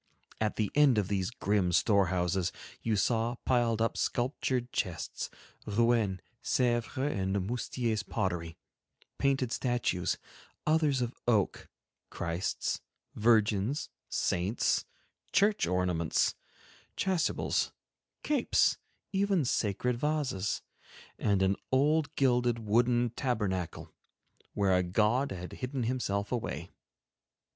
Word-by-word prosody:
At 110 -1 0
the 105 -3 -1
end 145 -5 +5
of 100 -2 +1
these 95 -2 0
grim 105 -7 0
storehouses 90 -2 +2 0.3
you 115 -2 0
saw 115 +4 +1
piled 115 -3 +2
up 115 - 0
sculptured 125 0 -1
chests, 90 -4 -3 0.4
Rouen, 110 -3 +2 0.2
Sevres, 120 0 0
and 100 -8 0
Moustier's 120 -1 -1
pottery, 90 -7 -3 0.6
painted 135 -3 +1
statues, 120 -9 0 0.5
others 155 -4 +3
of 120 +1 -3
oak, 110 -5 +1 0.4
Christs, 85 +2 -2 0.3
Virgins, 110 +3 +2 0.2
Saints, 95 +7 +1 0.5
church 205 +1 +3
ornaments, 90 -3 +1 0.6
chasubles, 185 -4 0 0.5
capes, 290 -5 +2 0.3
even 195 -5 +2
sacred 120 +2 0
vases, 135 -9 -1 0.6
and 100 -2 +2
an 95 +1 +3 0.2
old 150 +3 +2
gilded 125 -3 +2
wooden 120 +2 +2
tabernacle, 105 - -2 0.6
where 100 -2 +3
a 90 - +4
god 105 +9 +1
had 90 -1 -6
hidden 130 0 -3
himself 105 -5 -1
away. 90 - -3
115 Hz, 100 wpm, -31 LUFS, 95-125 Hz, 0.6 s, end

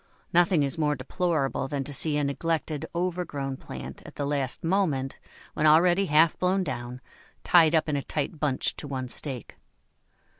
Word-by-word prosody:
Nothing 175 -2 +4
is 140 +3 -1
more 150 -1 +2
deplorable 140 0 -1
than 140 0 -2
to 145 - -5
see 150 +1 +2
a 145 - +1
neglected, 155 +1 -2
overgrown 170 -7 -2
plant, - - -9
at - - -12
the 145 - -2
last 140 -3 -1
moment, 165 -7 0 0.3
when 155 - +2
already 175 +5 +5
half 155 +1 +4
blown 185 +1 +2
down, 125 -5 -5 0.4
tied 165 -2 +5
up 160 - +2
in 150 - 0
a 140 - 0
tight 150 +2 -3
bunch 145 -4 0
to - - -5
one 130 -2 -4
stake. 125 -1 -5
150 Hz, 165 wpm, -27 LUFS, 135-170 Hz, 0.4 s, already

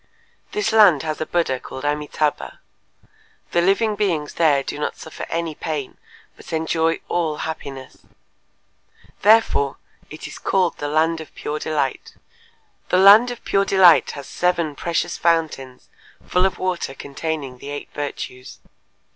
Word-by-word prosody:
This 420 - 0
land 205 -10 +6
has 155 -1 -3
a 155 - -2
Buddha 165 -7 0
called 130 - -9
Amitâbha. 150 - -2 0.9
The 170 - +2
living 210 +4 +2
beings 175 -8 -1
there 150 -5 +3
do 145 - -6
not 150 - -3
suffer 160 - -8
any 165 -1 -2
pain, 150 -3 -5 0.4
but - - -13
enjoy 160 0 0
all 160 -3 -1
happiness. 135 -4 -7 1.2
Therefore, 210 -10 +4 0.3
it - - -9
is - - -8
called 185 -3 0
the 145 - -3
land 160 +2 +1
of 160 - -13
Pure 150 +1 -4
Delight… 150 -4 -2 0.7
the - - +3
land 205 +6 +8
of 245 -1 -8
Pure 195 0 +2
Delight 185 -5 +6
has 140 - -7
seven 170 -1 0
precious 170 +2 -2
fountains 155 -6 -1 0.4
full 180 +1 +2
of 190 - -6
water 180 -7 -2
containing 140 -2 -5
the 140 - -9
eight 145 0 -6
virtues. 130 -3 -6
160 Hz, 140 wpm, -21 LUFS, 145-180 Hz, 1.2 s, land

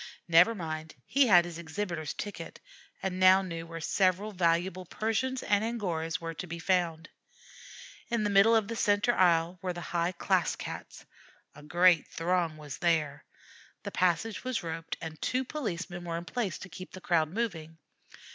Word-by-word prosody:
Never 175 +7 +6
mind; 160 -3 -5
he 275 -1 +3
had 175 -5 +7
his 170 -1 -7
exhibitor's 170 -2 -4
ticket, 205 - -7 0.4
and 185 -1 -2
now 185 +1 +7
knew 165 -2 -6
where 165 0 -7
several 185 +5 +1
valuable 180 0 +1
Persians 225 +7 -2
and 205 0 +2
Angoras 175 -8 -2
were 165 0 -5
to 180 +3 -7
be 170 0 -5
found. 170 -2 0 1.0
In 235 -3 0
the 205 - 0
middle 200 +3 +6
of 220 -3 +2
the 230 - -4
centre 205 +2 +2
aisle 175 -1 +3
were 185 -1 -2
the 175 - -7
high 170 +1 +1
class 170 - +1
Cats. - - -8 0.5
A 145 - -13
great 175 +2 +4
throng 170 -2 -1
was 150 -3 -8
there. 160 -4 0 0.6
The - - -5
passage 185 +5 0
was 255 -6 -2
roped, 165 0 -5
and 160 -2 -7
two 255 +2 0
policemen 180 - -4
were 165 -1 -3
in 170 - -6
place 210 -4 -2
to - - -9
keep 185 +1 -10
the 185 - -8
crowd 165 -3 +2
moving. 165 -6 -4
175 Hz, 170 wpm, -30 LUFS, 165-205 Hz, 1.0 s, had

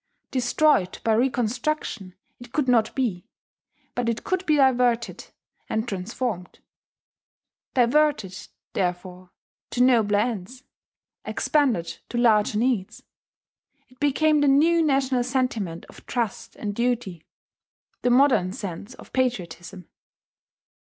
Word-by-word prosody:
Destroyed 255 -5 +2
by 225 - +2
reconstruction 245 -3 -1 0.2
it 245 -1 -12
could 295 -1 0
not 230 -3 +2
be; 225 -7 -2 0.7
but 245 -1 -1
it 230 - -3
could 370 0 -1
be 305 - +4
diverted 250 -4 +2 0.4
and 220 +2 -1
transformed. 195 -1 -4 1.2
Diverted, 245 -6 +2 0.4
therefore, 180 0 -3 0.4
to 250 - +2
nobler 225 -5 +4
ends 235 +3 -3 0.6
expanded 245 - 0
to 240 - -4
larger 215 -3 +3
needs, 230 -5 -1 0.9
it 255 - -23
became 300 +1 +2
the 290 - +3
new 320 +5 +4
national 270 -4 +1
sentiment 240 -9 -2
of - - -16
trust 235 -5 -3
and 205 -2 -4
duty: 235 -7 -2 0.8
the 245 - +1
modern 245 -8 +4
sense 200 -1 -7
of - - -15
patriotism. 185 -8 -3
240 Hz, 110 wpm, -24 LUFS, 200-260 Hz, 1.2 s, be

